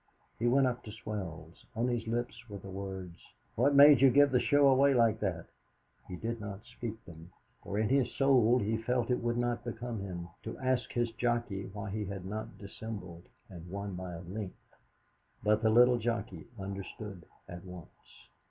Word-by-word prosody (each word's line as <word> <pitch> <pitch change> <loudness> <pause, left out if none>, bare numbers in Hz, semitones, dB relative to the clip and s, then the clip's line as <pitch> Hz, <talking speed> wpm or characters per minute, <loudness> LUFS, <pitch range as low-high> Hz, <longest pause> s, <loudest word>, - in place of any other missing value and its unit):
He 120 - +1
went 135 +3 +4
up 125 -1 -1
to 105 - -7
Swells. 95 -7 -7
On 115 +3 +1
his 120 -2 -1
lips 120 0 -3
were 100 - -6
the 95 0 -10
words: 95 -3 -6 0.3
"What 140 +5 +3
made 140 -2 +9
you 135 - +8
give 140 +2 +5
the 125 - +4
show 145 +3 +4
away 135 +1 +5
like 115 -2 +3
that?" 90 -5 -2 0.6
He 90 - -6
did 115 +4 -4
not 105 +1 -7
speak 115 -2 -7
them, 85 +1 -12 0.3
for 100 - -4
in 110 0 +2
his 130 -2 +2
soul 125 -4 +4
he 110 -1 0
felt 125 +1 0
it 125 - +1
would 120 0 0
not 120 0 -1
become 120 -1 -5
him 90 -3 -6
to 115 - -6
ask 130 -1 0
his 120 -1 0
jockey 120 -4 -1
why 105 0 -6
he 105 +1 -2
had 95 -2 -6
not 105 +3 -6
dissembled 100 -4 -8 0.2
and 85 -2 -10
won 100 +1 -5
by 90 0 -6
a 85 - -7
length. 95 +2 -8 0.7
But 105 +1 +3
the 110 - +3
little 120 +2 +6
jockey 100 -7 -3
understood 100 -1 -7 0.2
at 85 0 -9
once. 90 -8 -13
110 Hz, 185 wpm, -32 LUFS, 95-120 Hz, 0.7 s, made